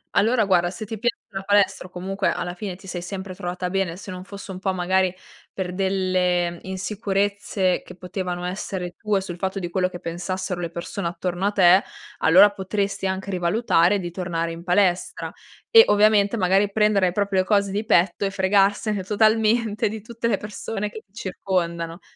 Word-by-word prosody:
Allora 225 Hz, +2 st, +3 dB
guarda, 175 Hz, -3 st, +3 dB
se 215 Hz, +3 st, -7 dB
ti 220 Hz, 0 st, -6 dB
piace 240 Hz, +2 st, 0 dB
la 195 Hz, -1 st, -5 dB
palestra 195 Hz, -2 st, +2 dB
o -, -, -21 dB
comunque 190 Hz, +2 st, -3 dB
alla 175 Hz, 0 st, -3 dB
fine 185 Hz, 0 st, -5 dB
ti 195 Hz, +2 st, -16 dB
sei 180 Hz, -2 st, -5 dB
sempre 190 Hz, +1 st, -6 dB
trovata 180 Hz, 0 st, -4 dB
bene, 190 Hz, -2 st, -1 dB
se 200 Hz, +1 st, -9 dB
non 185 Hz, 0 st, -8 dB
fosse 200 Hz, 0 st, -9 dB
un 185 Hz, -, -7 dB
po' 190 Hz, -1 st, -1 dB
magari 185 Hz, 0 st, +1 dB, 0.4 s
per 180 Hz, -2 st, -4 dB
delle 185 Hz, -2 st, 0 dB
insicurezze, 195 Hz, 0 st, -1 dB
che -, -, -12 dB
potevano 180 Hz, -1 st, -4 dB
essere 180 Hz, -1 st, -4 dB
tue 210 Hz, -3 st, 0 dB
sul 180 Hz, -2 st, -7 dB
fatto 190 Hz, +2 st, -3 dB
di 175 Hz, -, -4 dB
quello 185 Hz, +1 st, +1 dB
che 175 Hz, -1 st, -9 dB
pensassero 180 Hz, +2 st, -4 dB
le 170 Hz, -, -3 dB
persone 170 Hz, +2 st, -4 dB
attorno 175 Hz, +2 st, -3 dB
a 205 Hz, -, +2 dB
te, 185 Hz, 0 st, +6 dB, 0.4 s
allora 190 Hz, +5 st, +7 dB
potresti 200 Hz, 0 st, -2 dB
anche 190 Hz, +1 st, -3 dB
rivalutare 180 Hz, +1 st, +2 dB
di 175 Hz, -2 st, -5 dB
tornare 170 Hz, -2 st, -2 dB
in 170 Hz, +1 st, -9 dB
palestra. 180 Hz, -1 st, +1 dB, 0.4 s
E 455 Hz, -, +11 dB
ovviamente 210 Hz, 0 st, +4 dB
magari 195 Hz, 0 st, +2 dB
prendere 205 Hz, -3 st, +2 dB
proprio 200 Hz, -1 st, +1 dB
le 185 Hz, -, +2 dB
cose 200 Hz, -2 st, +2 dB
di 205 Hz, +3 st, -2 dB
petto 185 Hz, -2 st, +2 dB
e 195 Hz, -, -1 dB
fregarsene 200 Hz, +1 st, +2 dB
totalmente 220 Hz, +1 st, +2 dB
di 215 Hz, 0 st, -5 dB
tutte 230 Hz, +1 st, -4 dB
le 230 Hz, -, +2 dB
persone 210 Hz, 0 st, -5 dB
che 215 Hz, +1 st, -10 dB
ti 195 Hz, -, -41 dB
circondano. 175 Hz, -4 st, -3 dB
190 Hz, 180 wpm, -23 LUFS, 180-205 Hz, 0.4 s, E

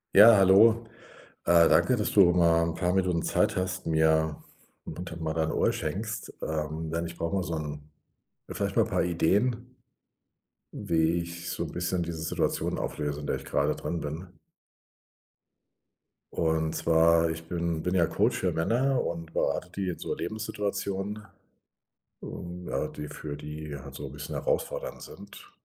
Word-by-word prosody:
Ja, 110 Hz, +3 st, +10 dB
hallo. 110 Hz, +5 st, +6 dB, 0.6 s
Äh, 85 Hz, -1 st, +6 dB
danke, 125 Hz, -, +4 dB
dass 105 Hz, -, -1 dB
du 95 Hz, -4 st, +6 dB
mal 85 Hz, -1 st, +4 dB
'n 85 Hz, 0 st, -2 dB
paar 90 Hz, 0 st, 0 dB
Minuten 90 Hz, -3 st, +1 dB
Zeit -, -, +1 dB
hast, 95 Hz, -1 st, -2 dB
mir 80 Hz, -1 st, +2 dB, 0.4 s
mal 80 Hz, -2 st, -5 dB
dein 80 Hz, -1 st, 0 dB
Ohr -, -, +2 dB
schenkst, -, -, -4 dB
ähm, 80 Hz, +1 st, -3 dB
denn 85 Hz, +1 st, -1 dB
ich 85 Hz, 0 st, -10 dB
brauch 85 Hz, -, -2 dB
mal 95 Hz, -, +1 dB
so 85 Hz, -, -4 dB
'n 75 Hz, -1 st, -6 dB, 0.6 s
vielleicht -, -, -2 dB
mal -, -, +5 dB
'n -, -, -8 dB
paar -, -, +1 dB
Ideen 100 Hz, +8 st, +2 dB, 1.2 s
wie 80 Hz, +1 st, +1 dB
ich 85 Hz, 0 st, -7 dB
so -, -, -2 dB
'n -, -, -6 dB
bisschen 90 Hz, 0 st, -1 dB
diese 85 Hz, -1 st, -5 dB
Situation 80 Hz, -, -1 dB
auflöse, 75 Hz, -1 st, -3 dB
in 75 Hz, -, -6 dB
der -, -, 0 dB
ich 70 Hz, -, -12 dB
grade 65 Hz, -, +1 dB
drin 85 Hz, -, -3 dB
bin. 80 Hz, +6 st, -5 dB, 2.1 s
Und 80 Hz, -1 st, 0 dB
zwar, 85 Hz, 0 st, +4 dB
ich 80 Hz, 0 st, -6 dB
bin 85 Hz, -1 st, -2 dB
bin 90 Hz, +1 st, 0 dB
ja 85 Hz, -2 st, +4 dB
Coach -, -, +1 dB
für -, -, +1 dB
Männer 120 Hz, +10 st, +1 dB
und 85 Hz, -1 st, -5 dB
berate 90 Hz, -, -1 dB
die 95 Hz, 0 st, -3 dB
in 90 Hz, -, -4 dB
so -, -, -3 dB
Lebenssituationen, 100 Hz, 0 st, -3 dB, 0.9 s
und 90 Hz, 0 st, -8 dB
ja, -, -, -1 dB
die 75 Hz, -, -7 dB
für 75 Hz, 0 st, -7 dB
die 75 Hz, 0 st, -7 dB
halt 65 Hz, -, -11 dB
so -, -, -6 dB
'n -, -, -10 dB
bisschen 75 Hz, +1 st, -7 dB
herausfordernd -, -, -2 dB
sind. 405 Hz, -1 st, -12 dB
85 Hz, 160 wpm, -28 LUFS, 80-95 Hz, 2.1 s, Ja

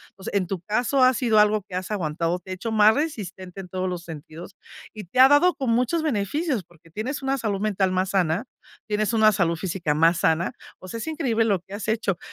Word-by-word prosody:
Pues, 190 Hz, 0 st, -7 dB
en 195 Hz, -3 st, +1 dB
tu 190 Hz, +1 st, -3 dB
caso, 245 Hz, +8 st, +1 dB
ha 255 Hz, 0 st, +6 dB
sido 230 Hz, -3 st, +1 dB
algo 210 Hz, 0 st, +4 dB
que 180 Hz, -, -6 dB
has 185 Hz, +2 st, -4 dB
aguantado, 170 Hz, -2 st, -1 dB
te 180 Hz, -, -16 dB
ha -, -, -3 dB
hecho 225 Hz, +5 st, -5 dB
más 215 Hz, 0 st, +5 dB
resistente 195 Hz, -, -4 dB
en 180 Hz, -, -12 dB
todos 185 Hz, +1 st, -2 dB
los 180 Hz, -2 st, -4 dB
sentidos 165 Hz, +3 st, -10 dB, 0.4 s
y 215 Hz, -, -7 dB
te 185 Hz, +8 st, -4 dB
ha 260 Hz, -, +10 dB
dado 290 Hz, +6 st, +5 dB
como 250 Hz, -6 st, 0 dB
muchos 255 Hz, +8 st, +1 dB
beneficios, 270 Hz, -, -1 dB
porque 165 Hz, -1 st, -22 dB
tienes 235 Hz, -, -4 dB
una 270 Hz, 0 st, 0 dB
salud 215 Hz, -6 st, -2 dB
mental 200 Hz, -3 st, 0 dB
más 185 Hz, +1 st, 0 dB
sana, 180 Hz, +2 st, 0 dB, 0.4 s
tienes 215 Hz, +1 st, 0 dB
una 220 Hz, -1 st, +5 dB
salud 170 Hz, -5 st, +1 dB
física 170 Hz, -2 st, -2 dB
más 165 Hz, +3 st, +3 dB
sana. 165 Hz, +7 st, +1 dB, 0.3 s
O 185 Hz, -, -11 dB
sea, 210 Hz, -, -6 dB
es 230 Hz, -, -5 dB
increíble 270 Hz, -9 st, 0 dB
lo 200 Hz, -4 st, +1 dB
que 190 Hz, +3 st, -10 dB
has 205 Hz, 0 st, -6 dB
hecho. 215 Hz, -4 st, 0 dB
200 Hz, 230 wpm, -24 LUFS, 180-230 Hz, 0.4 s, ha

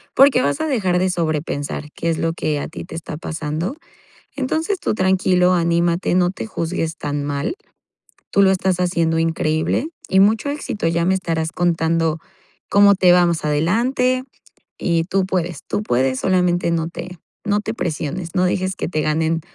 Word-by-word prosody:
porque 270 Hz, -1 st, +6 dB
vas 280 Hz, -, 0 dB
a 315 Hz, -, 0 dB
dejar 190 Hz, -11 st, +1 dB
de 185 Hz, +1 st, +1 dB
sobrepensar 150 Hz, -3 st, -2 dB
qué 170 Hz, -, -2 dB
es 165 Hz, -, 0 dB
lo 165 Hz, 0 st, 0 dB
que 155 Hz, -3 st, -1 dB
a -, -, -4 dB
ti 160 Hz, -, -8 dB
te 170 Hz, -, -9 dB
está 160 Hz, -2 st, -6 dB
pasando. 160 Hz, -, -4 dB, 0.6 s
Entonces, 320 Hz, +8 st, -1 dB
tú -, -, -1 dB
tranquilo, 185 Hz, -2 st, +3 dB
anímate. 170 Hz, +1 st, +1 dB
No 180 Hz, -1 st, +3 dB
te 195 Hz, -, -6 dB
juzgues 165 Hz, -4 st, -3 dB
tan 145 Hz, 0 st, -3 dB
mal. 145 Hz, -, -2 dB, 0.7 s
Tú 200 Hz, -, +4 dB
lo 190 Hz, -, +5 dB
estás 185 Hz, -1 st, +1 dB
haciendo 170 Hz, -2 st, +1 dB
increíble 160 Hz, -, 0 dB, 0.2 s
y 190 Hz, -, +4 dB
mucho 215 Hz, +6 st, +3 dB
éxito. 285 Hz, -, -3 dB
Ya 170 Hz, 0 st, +1 dB
me 190 Hz, -, +3 dB
estarás 165 Hz, -3 st, -2 dB
contando 165 Hz, -2 st, +1 dB, 0.5 s
cómo 200 Hz, 0 st, +6 dB
te 180 Hz, -1 st, +5 dB
va 180 Hz, 0 st, +5 dB
más 170 Hz, -2 st, 0 dB
adelante. 245 Hz, -, +1 dB, 0.5 s
Y 170 Hz, -2 st, +1 dB
tú 195 Hz, +2 st, 0 dB
puedes, 175 Hz, -4 st, -2 dB
tú 205 Hz, -, -2 dB
puedes, 130 Hz, -, 0 dB
solamente 180 Hz, -2 st, +1 dB
no 165 Hz, -1 st, 0 dB
te 180 Hz, +1 st, -8 dB, 0.3 s
no 205 Hz, -1 st, +1 dB
te 210 Hz, -, -4 dB
presiones. 170 Hz, -3 st, -4 dB
No 180 Hz, -, +2 dB
dejes 185 Hz, +1 st, 0 dB
que -, -, -3 dB
te 155 Hz, -2 st, -1 dB
ganen 160 Hz, +2 st, 0 dB
175 Hz, 175 wpm, -20 LUFS, 160-190 Hz, 0.7 s, porque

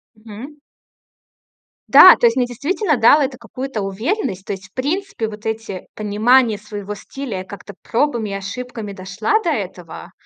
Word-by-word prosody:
Мгм. 220 Hz, +6 st, -11 dB, 1.3 s
Да, 370 Hz, -, +10 dB
то -, -, +1 dB
есть 230 Hz, 0 st, +4 dB
мне 250 Hz, -2 st, +1 dB
действительно 300 Hz, -, -1 dB
дало 240 Hz, +6 st, +6 dB
это 265 Hz, -2 st, -2 dB
какую-то 245 Hz, 0 st, -6 dB
уверенность. 195 Hz, -, -3 dB
То -, -, -3 dB
есть, 195 Hz, 0 st, -10 dB
в -, -, -49 dB
принципе, 295 Hz, -, -2 dB
вот 210 Hz, 0 st, -11 dB
эти 220 Hz, -4 st, -5 dB
понимание 220 Hz, +2 st, +2 dB
своего 210 Hz, -1 st, -7 dB
стиля, 230 Hz, 0 st, -6 dB
я -, -, -6 dB
как-то 200 Hz, +1 st, -11 dB
пробами 235 Hz, -4 st, -1 dB
и -, -, -4 dB
ошибками 210 Hz, +2 st, -6 dB
дошла 195 Hz, -, -1 dB
до 345 Hz, -, 0 dB
этого. 185 Hz, -, -5 dB
225 Hz, 160 wpm, -19 LUFS, 200-265 Hz, 1.3 s, Да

